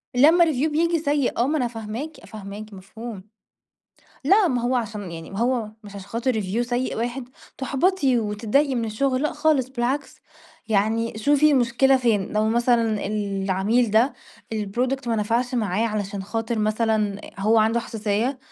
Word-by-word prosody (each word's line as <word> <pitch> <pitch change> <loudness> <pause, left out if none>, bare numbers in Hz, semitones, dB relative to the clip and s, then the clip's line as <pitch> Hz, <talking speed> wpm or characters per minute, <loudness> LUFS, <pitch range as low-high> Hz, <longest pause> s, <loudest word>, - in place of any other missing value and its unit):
لما 325 +7 +6
review 310 0 0
بييجي 335 +2 +1
سيء 285 -3 0
آه، 240 +3 +2
ما 310 +1 +1
أنا 250 -3 0
فاهماكِ 235 +7 -7
فاهماكِ، 210 0 -9
مفهوم. 200 +1 -9 1.0
لأ، 390 +3 +5
ما 245 -2 0
هو 250 +1 +1
عشان 210 -6 -4
يعني 165 -1 -8
ما 195 - -6
هو 240 -1 +1 0.2
مش 205 0 -11
عشان 200 0 -10
خاطر 240 +4 -1
review 195 +5 -2
سيّء 245 +1 -1
واحد 240 +2 -3 0.3
تُحبَطي 275 -1 +1
وتتضايقي 225 +6 +1
من 235 -2 -1
الشغل، 255 +5 0
لأ 300 - 0
خالص 290 -5 +1
بالعكْس، 265 +2 -2 0.5
يعني 220 +2 0
شوفي 290 +5 +4
المشكلة 265 +1 +3
فين 225 -6 0
لو 215 +1 +1
مثلًا 230 -3 +1
العميل 200 +2 0
ده 230 +6 +3 0.4
الproduct 245 +5 -2
ما 225 - +1
نفَعش 235 +4 0
معاه 215 -1 0
علشان 205 -2 -3
خاطِر 225 +2 -3
مثلًا 215 -1 0 0.2
هو 220 +3 +3
عنده 225 +2 +2
حساسيّة، 225 +4 -2
230 Hz, 155 wpm, -23 LUFS, 210-260 Hz, 1.0 s, لما